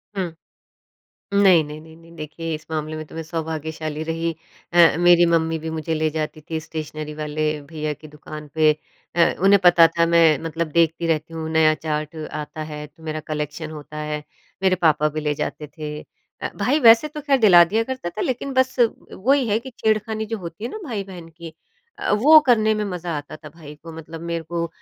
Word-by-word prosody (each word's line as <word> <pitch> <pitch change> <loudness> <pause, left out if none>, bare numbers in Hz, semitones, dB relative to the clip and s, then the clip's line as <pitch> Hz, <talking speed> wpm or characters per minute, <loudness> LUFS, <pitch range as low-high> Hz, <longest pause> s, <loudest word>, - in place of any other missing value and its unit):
हुँ। 180 -4 -3 1.0
नहीं, 190 -5 +6
नहीं, 150 +1 -8
नहीं, 160 0 -15
नहीं। 165 0 -17
देखिए, 160 +1 -5
इस 155 0 -8
मामले 155 0 -3
में 155 - -5
तो - - -15
मैं 165 - -4
सौभाग्यशाली 160 -1 -4
रही। 165 +1 -2 0.4
अ, 170 -2 +6
मेरी 175 0 +6
मम्मी 165 -1 +1
भी 160 +1 -5
मुझे 160 0 -3
ले 155 0 +1
जाती 155 0 -4
थी 160 -1 -2
स्टेशनरी 155 -1 -6
वाले 155 0 -2 0.2
भईया 155 -1 -3
की 155 - -14
दुकान 150 0 -10
पे। 155 -1 +5 0.5
अ, 170 - +4
उन्हें 200 +1 +6
पता 175 -1 +8
था 170 0 +4
मैं 165 -3 +5
मतलब 165 +1 -2
देखती 165 +1 +2
रहती 165 0 -1
हूँ 160 -1 -4
नया 160 -1 +4
चार्ट 155 0 -4 0.2
आता 155 +1 -5
है 150 0 -6
तो 155 +3 -22
मेरा 155 -1 -4
कलेक्शन 150 +1 -4
होता 150 -1 -9
है। 150 0 -4 0.4
मेरे 190 -1 +3
पापा 150 -1 +4
भी 155 +1 -4
ले 150 -1 -1
जाते 150 +1 -4
थे। 150 -1 -5 0.4
अ, - - -2
भाई 280 +5 +1
वैसे 230 +3 +7
तो 300 0 -7
खैर 280 -2 +2
दिला 180 -6 +8
दिया 215 +6 0
करता 255 -9 -4
था 210 - -7
लेकिन 260 +2 -2
बस 260 0 +2 0.4
वही 265 +4 +1
है 210 +1 +2
कि 260 +2 -9
छेड़खानी 220 0 0
जो 225 +1 -4
होती 170 +3 -8
है 240 - -3
ना - - -6
भाई-बहन 195 - -6
की 165 0 -11 0.4
अ, - - -2
वो 285 +10 +7
करने 220 -3 +4
में 210 0 -1
मज़ा 180 -3 -5
आता 145 +1 -7
था 155 0 -12
भाई 150 -1 -12
को। 165 0 -9
मतलब 165 0 -9
मेरे 170 0 -3
को 170 +1 -2
165 Hz, 205 wpm, -22 LUFS, 155-185 Hz, 1.0 s, पता